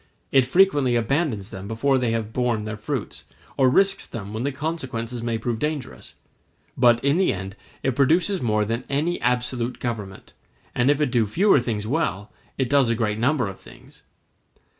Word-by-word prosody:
It 135 -2 +4
frequently 145 -6 +3
abandons 120 - -1
them 95 +1 -7
before 130 +5 +1
they 125 -2 0
have 110 -1 -2
borne 120 -4 0
their 110 0 -4
fruits, 105 - -5 0.3
or 130 -2 +4
risks 195 +7 +2
them 105 -2 -7
when 110 - -3
the 140 +3 -1
consequences 130 -5 -4
may 115 -1 -1
prove 115 0 -3
dangerous; 150 -2 -5 0.6
but 120 0 +4
in 140 +3 +3
the 190 - +3
end 95 +1 -6 0.3
it 130 -2 0
produces 170 +8 +2
more 105 -3 +1
than 115 +4 -2
any 155 +5 -1
absolute 125 0 -1
government, 105 -6 -6 0.4
and 125 +2 +2
if 145 0 +3
it 145 -4 +1
do 120 -4 +2
fewer 185 - +4
things 110 -4 -3
well, 105 - -2 0.3
it 130 - 0
does 140 -2 +3
a 115 - +2
greater 110 -2 -1
number 130 -2 +2
of 95 - -8
things. - - -17
125 Hz, 180 wpm, -23 LUFS, 110-140 Hz, 0.6 s, It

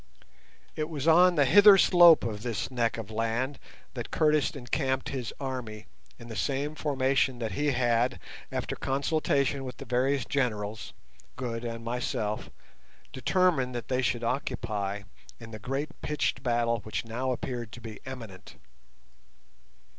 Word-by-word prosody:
It 155 0 -2
was 150 -2 -4
on 175 +2 +6
the 145 -3 +4
hither 200 +7 +8
slope 175 -3 +7
of 105 -2 -3
this 120 +1 -3
neck 115 -3 0
of 110 -2 -7
land 115 +5 -1 0.3
that 120 -4 -6
Curtis 150 -2 +2
encamped 130 0 -2
his 125 -5 -4
army 125 -6 -5 0.3
in 115 - -12
the 115 - -7
same 140 +4 -1
formation 135 -3 +1
that 115 -3 -3
he 145 +10 -1
had, 120 -1 +1 0.3
after - - -3
consultation 140 -1 0
with 125 -1 -7
the 140 - -8
various 130 +2 +1
generals, 110 -6 -2 0.4
Good, 120 -2 -4
and 115 -1 -5
myself, 115 -3 -2 0.6
determined 135 -2 +1
that 120 - -5
they 130 0 +1
should 120 -2 0
occupy 105 -5 -2 0.4
in 115 -1 -10
the 110 - -8
great 135 +7 -3
pitched 150 -5 -1
battle 120 -2 +1
which 110 +2 -4
now 125 +3 -2
appeared 120 -2 -4
to - - -8
be 110 -3 -9
imminent. 115 -8 -9
125 Hz, 145 wpm, -28 LUFS, 115-140 Hz, 0.6 s, hither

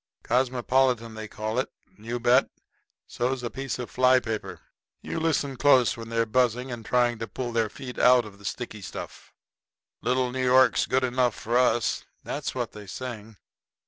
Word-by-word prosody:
Cosmopolitan 125 -1 +1
they 110 0 -7
call 110 +3 -3
it. 130 - -2 0.2
You 115 +3 -5
bet. 120 +1 +4 0.6
So's 125 +1 -2
a 120 - -3
piece 135 -1 -4
of 125 -2 -6
fly 130 0 +5
paper. 110 -3 -5 0.4
You 165 - -3
listen 145 -4 0
close 125 -3 +4
when 115 -1 -8
they're 115 0 +1
buzzing 125 +2 +1
and 120 -2 -6
trying 120 0 +1
to 115 - -4
pull 120 +4 -4
their 115 -2 +1
feet 125 +3 -8
out 125 -1 +6
of 100 -1 -12
the 100 - -14
sticky 110 -2 -5
stuff. 95 - -8 0.7
"Little 130 +1 +1
old 125 0 -3
New 130 0 -1
York's 130 0 +4
good 130 +1 +1
enough 125 -1 +1
for 120 +2 -3
us" 125 -2 +2 0.2
that's - - -4
what - - -2
they 105 -1 -11
sing. 110 -1 -7
120 Hz, 175 wpm, -26 LUFS, 115-130 Hz, 0.7 s, out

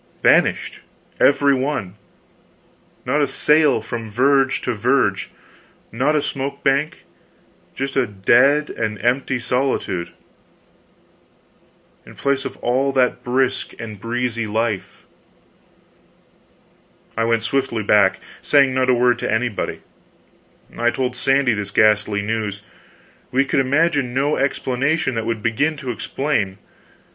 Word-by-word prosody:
Vanished, - - +2 0.4
every 140 0 +4
one! 130 -8 -2 1.1
Not 140 +4 +1
a 145 - +2
sail, 150 -3 +3
from 115 0 -6
verge 135 +4 +2
to 125 - -2
verge, 115 -2 0 0.6
not 135 +6 +1
a 150 - +1
smoke 140 0 -4
bank 140 +3 0 0.7
just 135 +1 -4
a 135 -2 +2
dead 125 +9 +3
and 110 -2 -3
empty 130 +1 +1
solitude, 125 -8 -2 1.9
in - - -15
place 140 -1 -1
of - - -6
all 130 +3 +1
that 125 -2 +1
brisk 130 +1 -1
and 110 -3 -8
breezy 115 0 -2
life. 110 -1 -3 2.1
I 115 - 0
went 115 -1 +1
swiftly 120 -5 -1
back, 100 -1 +3 0.2
saying 140 -3 +3
not 130 0 +1
a 125 - +5
word 125 0 +2
to 125 - -2
anybody. 110 -1 -2 0.9
I 120 0 +1
told 125 0 -2
Sandy 135 -1 +2
this 105 -1 -4
ghastly 105 -1 +2
news. 105 -2 -3 0.7
We 135 +2 +1
could 140 +1 0
imagine 140 -1 +1
no 140 +3 +1
explanation 140 +2 0
that 115 -1 -3
would 115 -2 -3
begin 145 +7 0
to 130 -3 -4
explain. 115 -6 -2
125 Hz, 120 wpm, -20 LUFS, 115-140 Hz, 2.1 s, a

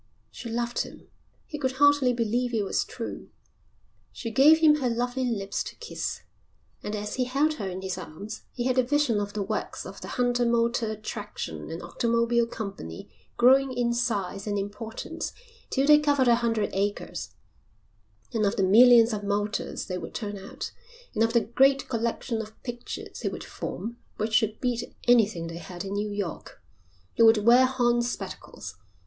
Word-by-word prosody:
She 235 - -8
loved 235 +1 -2
him. - - -6 0.4
He 300 - -7
could 260 -2 0
hardly 285 -1 +4
believe 240 +1 0
it 215 - +1
was - - 0
true. - - -7 0.8
She 230 - -6
gave 285 +7 +7
him 310 -2 +5
her 260 -4 0
lovely 245 +2 -1
lips 200 -5 -2
to - - -8
kiss. 470 - -5 0.6
And 210 - -4
as 210 +2 -4
he 255 - +1
held 280 +5 +1
her 195 - -2
in 185 +1 -6
his 190 -1 -3
arms 195 +6 -8
he 245 - -4
had 255 0 +2
a - - +5
vision 255 -4 +2
of 205 0 -3
the 210 - -1
works 215 +2 -4
of - - -9
the - - -7
Hunter 245 -1 +1
Motor 235 -1 +1
Traction 205 - -6
and 165 +2 -6
Automobile 235 +5 +1
Company 195 - -7 0.3
growing 265 +2 +5
in 240 -1 +1
size 200 -5 -1
and 205 -1 0
importance 205 +3 -5 0.4
till 270 0 +1
they 300 0 +7
covered 285 -3 +2
a 240 - +7
hundred 230 -3 0
acres, 200 +1 -3 1.0
and 225 -2 +1
of 200 - +2
the 195 - +1
millions 230 +3 +7
of 205 -1 -3
motors 205 +1 -2
they 180 -1 -4
would - - -8
turn 205 -3 -4
out, 195 0 -7 0.4
and 225 - +2
of 225 0 +1
the 235 - +5
great 270 +5 +3
collection 230 -1 -1
of 220 0 -11
pictures 240 -1 -6
he - - -3
would - - -7
form 225 +6 -6 0.2
which 215 +1 -2
should 220 -1 +2
beat 245 -1 -2
anything 220 -8 +4
they 165 0 -6
had 175 +1 -7
in 195 - -4
New 205 +1 -1
York. 205 -5 -5 0.5
He - - -1
would 225 -2 +6
wear 245 +2 +7
horn 240 -2 +2
spectacles. 240 +1 -6
230 Hz, 180 wpm, -27 LUFS, 205-245 Hz, 1.0 s, gave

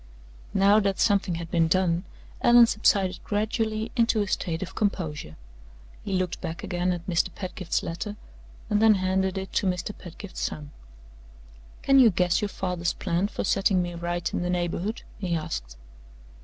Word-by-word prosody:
Now 200 +2 +5
that 195 -2 0
something 200 -5 +2
had 165 0 -6
been 165 -1 +3
done, 180 +1 +1 0.4
Allan 240 0 +8
subsided 195 -4 +1
gradually 220 +1 -1
into 230 -3 +3
a - - -5
state 170 -2 -2
of 180 - -8
composure. 155 - -2 0.7
He 195 - -4
looked 185 -2 -1
back 160 - -5
again 180 +1 -1
at 175 -1 -4
Mr. 180 -1 +1
Pedgift's 185 -2 -3
letter, 190 +5 -4 0.5
and 210 -1 +1
then 220 -1 +6
handed 190 0 0
it 190 0 -5
to 195 - +1
Mr. 180 +3 -2
Pedgift's 185 +2 -10
son. 150 -1 -4 1.1
"Can 275 0 +5
you 245 -3 +8
guess 180 0 +1
your 210 - -1
father's 180 -3 -2
plan 180 +2 -1
for - - -4
setting 195 -2 +2
me 175 0 -5
right 175 0 -3
in - - -1
the 175 - -2
neighborhood?" 180 +4 -2 0.2
he 180 -4 -1
asked. - - -5
185 Hz, 165 wpm, -26 LUFS, 175-205 Hz, 1.1 s, Allan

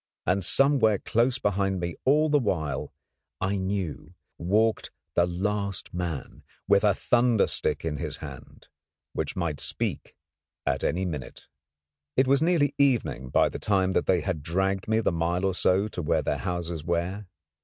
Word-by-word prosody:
And 95 +1 +1
somewhere 130 - +4
close 120 +6 +1
behind 100 -3 0
me 85 -1 -3
all 150 +4 +4
the 150 -1 +3
while, 80 - -2 0.5
I 95 +1 0
knew, 95 -6 -3 0.2
walked 110 +6 +1 0.2
the 85 0 +3
last 100 +2 -2
man, 85 -5 -4 0.3
with - - +4
a - - +4
thunder 120 -3 +3
stick - - -2
in 75 -2 -2
his - - -4
hand, - - -11 0.5
which - - -3
might 85 -5 -2
speak - - -3 0.5
at 70 -1 0
any 95 +3 0
minute. 75 -8 -6 0.7
It 130 - +5
was 135 +2 +3
nearly 160 -4 +3
evening 95 - +1
by - - +4
the - - -6
time 95 -2 +1
that - - 0
they 90 -2 +3
had 80 -1 -2
dragged 95 +4 -1
me 110 +1 +2
the - - +1
mile 85 +2 0
or 95 - +1
so 95 +3 +2
to 90 - -5
where 75 - +1
their - - -1
houses 85 -4 -3
were. 90 +4 -2
95 Hz, 165 wpm, -27 LUFS, 85-110 Hz, 0.7 s, It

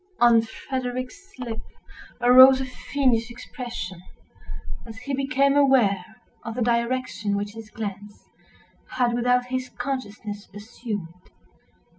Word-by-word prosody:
On 235 -1 +6
Frederick's 255 - -5
lip 235 -3 -5 0.6
arose 260 +2 +9
a 265 - -2
fiendish 250 -2 0
expression, 240 -7 -7 0.9
as 225 -1 -9
he 250 +5 -5
became 275 +1 +2
aware 255 -10 +4 0.4
of 225 0 -5
the 245 - 0
direction 235 -3 0
which 205 0 -3
his 225 -1 -10
glance 205 -1 -7 0.7
had, 245 -2 +2
without 245 +1 +2
his 255 0 -3
consciousness, 220 -5 -5
assumed. 205 -5 -7
240 Hz, 110 wpm, -25 LUFS, 215-255 Hz, 0.9 s, arose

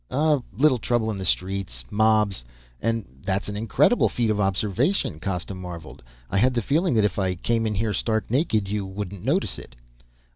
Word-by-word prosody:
"A 150 0 +2 0.2
little 135 -2 +4
trouble 110 0 0
in 100 - -4
the 95 - -4
streets. 95 -12 -2
Mobs. 105 - +2 0.4
And 115 -1 0 0.2
that's 95 +1 -1
an 105 - -4
incredible 115 - +3
feat 115 -3 0
of 105 - -1
observation," 105 - +1
Costa 90 +1 -3
marveled. 90 -4 -8 0.3
"I 100 - +2
had 125 +3 +3
the 120 - +2
feeling 155 - +2
that 110 -2 +4
if 105 0 -1
I 95 -2 0
came 115 +5 0
in 105 - -1
here 110 +1 0
stark 110 +1 -1
naked, 115 - +1
you 105 +1 -2
wouldn't 95 -1 -6
notice 155 - +1
it." - - -13
105 Hz, 185 wpm, -24 LUFS, 95-120 Hz, 0.4 s, little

